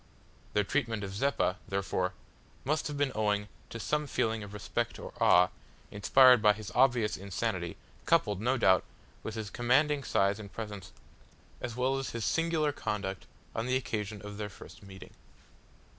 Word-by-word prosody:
Their 105 - +3
treatment 115 -2 -1
of 95 -1 -5
Zeppa, 110 -4 +1
therefore, 95 -1 -1 0.5
must 150 +3 0
have 145 -1 -5
been 140 -2 +1
owing 105 -1 0 0.2
to 115 - -7
some 150 +4 -1
feeling 110 -4 0
of 100 -1 -8
respect 105 +3 -3
or - - -8
awe, 90 +1 +6 0.4
inspired 125 +4 +6
by 105 0 +6
his 105 -3 -8
obvious 120 -4 +3
insanity, 95 -2 -3 0.3
coupled, 105 -2 +2
no 130 +4 +2
doubt, 95 -6 +4 0.4
with 110 - -6
his 110 -2 -5
commanding 140 +4 +2
size 100 -2 +1
and 100 -2 -9
presence 105 -4 -7 0.7
as 120 -2 -4
well 130 +2 +1
as 135 - -4
his 115 - -2
singular 160 - +1
conduct 100 -7 -4 0.3
on 115 +2 -2
the 130 0 +2
occasion 105 -4 -4
of 105 0 -7
their 105 -1 -4
first 95 - -13
meeting. 95 -1 -12
110 Hz, 160 wpm, -31 LUFS, 100-130 Hz, 0.7 s, awe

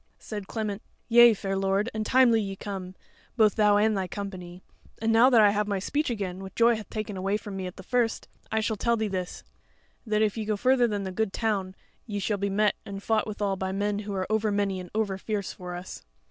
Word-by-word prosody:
Said 205 -3 -7
Clement: 215 -2 -3 0.3
"Yea, 240 -1 +8
fair 195 -1 -3
lord, 195 +2 +1
and 220 0 -2
timely 235 -1 +4
ye 195 -1 -4
come, 190 -2 -6 0.4
both 215 -3 +5
thou 210 -2 +4
and 215 +1 +3
thy 190 -1 -1
company; 185 -2 -7 0.4
and 225 0 +1
now 235 +3 +7
that 235 -4 +6
I 205 -1 +6
have 210 0 0
my 200 -1 0
speech 285 +10 -1
again 195 -6 -3
which 190 -1 -9
joy 235 0 +5
hath 215 -1 -8
taken 215 -2 -4
away 195 +2 0
from 205 -2 -8
me 190 -1 -4
at 180 - -8
the 190 - -9
first, 235 +1 0 0.2
I 220 - +1
shall 220 0 -1
tell 235 +3 +1
thee 220 -1 0
this, 185 -2 -4 0.6
that 215 0 +2
if 215 0 0
ye 220 - -2
go 210 -1 -1
further 250 +2 +3
than 205 -3 -2
the 190 - -4
good 220 +1 -1
town 195 -4 -1 0.3
ye 205 -2 -4
shall 205 +1 -1
be 200 +1 0
met 210 +1 +2
and 200 0 -7
fought 220 -1 +1
withal 205 -2 -2
by 190 0 -2
men 205 +1 -1
who 205 -1 -5
are 185 -1 -1
over 215 0 +1
many 200 -2 0
and 180 -1 -8
over 200 -3 -1
fierce 205 -1 -3
for 180 -1 -7
us." 175 - -8
205 Hz, 235 wpm, -27 LUFS, 195-220 Hz, 0.6 s, Yea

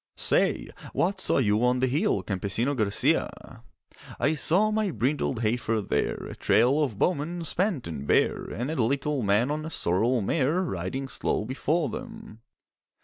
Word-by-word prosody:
] - - -66
'Say, - - +1 0.3
what 190 +2 0
saw - - +2
you 110 -3 +2
on 125 +1 +3
the 130 - +2
hill, 150 - 0
Campesino 100 +7 -1
Garcia?' 105 -5 0 0.6
'I 145 - +2
saw 185 +7 +2
my 215 -1 0
brindled 130 - -1
heifer 110 0 0
there, 100 - -1
A - - -8
trail 135 +5 +3
of 130 -9 -1
bowmen, 170 - -1
spent 180 - -1
and 70 -4 -6
bare, - - +2
And 120 - -4
a - - -3
little 140 +3 0
man 105 +6 +2
on 155 +1 -2
a 160 - -5
sorrel 115 - +1
mare 155 - +1
Riding 115 - -4
slow 105 - -2
before 150 +6 0
them. 220 - -9
135 Hz, 160 wpm, -26 LUFS, 110-165 Hz, 0.6 s, on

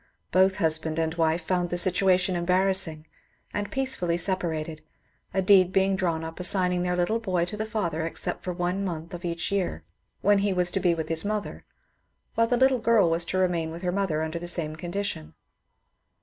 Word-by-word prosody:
Both 190 +1 +4
husband 160 -3 0
and 160 -1 0
wife 165 0 0
found 180 0 0
the 175 - -2
situation 185 0 +2
embarrassing 180 -2 +1 0.5
and 205 0 -3
peacefully 230 -11 0
sep 185 +1 0
arated, 160 -2 -4 0.5
a 190 - 0
deed 185 -1 +5
being 195 0 +2
drawn 170 -4 -1
up 160 +2 -7
assigning 180 -1 +2
their 180 0 0
little 180 +6 0
boy 185 -6 0
to 180 - -6
the 215 +1 -4
father 170 -8 -2
except - - -4
for 180 - -3
one 180 +2 -2
month 170 -2 -5
of 175 +1 -7
each 170 +1 -2
year, 180 - -1 0.4
when 205 +1 +4
he 200 0 +1
was 180 -1 +2
to 195 - -1
be 175 -3 +2
with 160 -1 -4
his 165 -1 +2
mother, 210 0 -4 0.7
while 230 0 +2
the 245 - +1
little 260 0 +3
girl 225 -6 +3
was 165 +1 0
to 185 - -2
remain 175 -3 0
with 165 +3 -8
her 180 - 0
mother 180 -5 -1
under 160 +1 -4
the 175 - -6
same 160 -3 +2
condition. 175 - -4
180 Hz, 195 wpm, -26 LUFS, 165-195 Hz, 0.7 s, deed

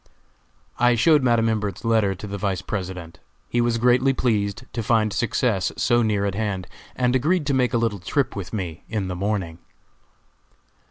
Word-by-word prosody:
I 120 0 +4
showed 150 +5 +4
Madam 115 -3 +3
Imbert's 110 -1 -2
letter 110 -4 +2
to 95 - -8
the 100 0 -5
Vice 95 -2 -1
President. 90 -4 -5 0.3
He 120 - 0
was 120 -1 +1
greatly 125 +3 +3
pleased 110 -3 0
to 115 - -2
find 110 -1 +2
success 115 -5 0
so 120 -1 +3
near 105 -3 +1
at 100 - -1
hand, 100 -3 -2 0.3
and 125 0 +1
agreed 155 +5 +1
to 140 - 0
make 125 -2 +2
a - - +4
little 115 -3 0
trip 130 +8 -1
with 95 -2 -6
me 90 -6 -5
in 105 -4 -2
the 90 - -3
morning. 95 -3 -2
110 Hz, 175 wpm, -23 LUFS, 100-120 Hz, 0.3 s, I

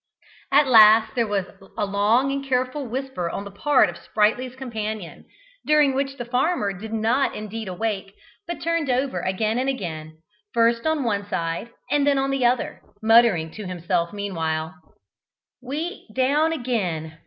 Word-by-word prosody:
At 285 +2 +6
last 220 -2 +7
there 235 -2 0
was 200 -3 -1 0.3
a 205 - +1
long 210 +7 +2
and 275 0 -2
careful 260 +1 -1
whisper 255 -8 -3
on 195 - -4
the 200 - -9
part 260 +3 +3
of 175 -1 -7
Sprightly's 240 +4 0
companion, 220 -7 -6 0.4
during 300 -2 +4
which 270 0 -2
the 240 - -5
farmer 250 - 0
did 215 +4 -8
not 225 +5 +1
indeed 215 +1 -6
awake 195 0 -3 0.3
but 345 - -5
turned 335 -4 0
over 260 +2 0
again 215 +5 -1
and 265 +1 0
again, 160 -10 -5 0.4
first 230 +3 +2
on 315 -3 +1
one 205 -4 -1
side 165 +6 -3 0.2
and 290 -1 +2
then 280 -1 +3
on 270 0 0
the 270 -2 0
other, 245 +1 0 0.2
muttering 220 -8 +4
to 210 +1 -8
himself 170 -1 -1
meanwhile: 165 -5 -3 0.9
"Wheat 305 - -5
down 290 +5 +2
again! 180 - -3
230 Hz, 155 wpm, -23 LUFS, 200-270 Hz, 0.9 s, last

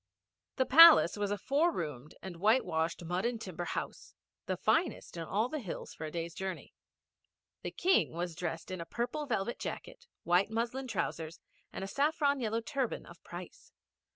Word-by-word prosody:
The 260 - +2
Palace 320 - +9
was 205 -1 -1
a 205 - -1
four 290 - +2
roomed, 150 - -5
and 185 -3 -7
whitewashed 170 -5 +1
mud 180 +3 -1
and 235 -1 -1
timber 180 -4 -5
house, - - -5 0.3
the - - -1
finest - - 0
in 170 - -4
all 205 +8 0
the 305 +4 -4
hills 205 -10 -6
for 160 - -6
a 155 - -6
day's 170 0 -4
journey. 190 0 -5 0.9
The - - -4
King 375 - +2
was 175 +1 -3
dressed 165 0 -5
in 185 -2 -4
a - - -5
purple 245 +5 -3
velvet 235 -1 -1
jacket, 480 -1 -7 0.2
white 180 +4 +3
muslin 235 +4 -2
trousers, 165 -8 -3 0.3
and - - -6
a - - -3
saffron 285 +4 +1
yellow 225 -1 -1
turban 265 0 -2
of - - -14
price. - - -10
205 Hz, 175 wpm, -32 LUFS, 170-260 Hz, 0.9 s, Palace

